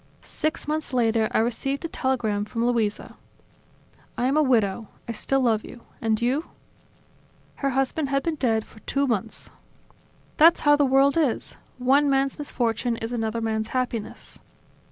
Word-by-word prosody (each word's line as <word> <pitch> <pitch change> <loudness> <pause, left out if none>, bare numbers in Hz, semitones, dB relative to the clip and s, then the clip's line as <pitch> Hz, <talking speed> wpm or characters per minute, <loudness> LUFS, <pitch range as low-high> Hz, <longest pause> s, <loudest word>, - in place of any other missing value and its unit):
Six 310 -1 -3
months 305 -2 -2
later, 225 -3 +2
I - - +1
received 260 +6 -1
a - - 0
telegram 240 -9 -1
from 230 +3 -2
Luisa: 230 -4 -1 1.0
"I 245 - 0
am 270 +3 +2
a 310 - +5
widow. 225 -6 +1 0.2
I - - -2
still 270 +4 0
love 225 -4 +2
you. 240 - -11 0.2
And 220 -2 +1
you?" 265 +7 0 1.1
Her 275 - 0
husband 270 +2 0
had 275 0 +1
been 330 - 0
dead 225 -7 0
for 220 - -17
two 280 +5 -1
months." 225 -4 -2 0.9
"That's 330 +2 +6
how 290 0 +5
the 290 -1 +3
world 270 +2 +4
is: 290 -8 0 0.2
one 275 +3 +3
man's 275 +1 +1
misfortune 240 -4 -1
is 225 +2 -5
another 225 -1 -2
man's 220 -1 -1
happiness." 245 -4 -4
250 Hz, 155 wpm, -25 LUFS, 225-275 Hz, 1.1 s, That's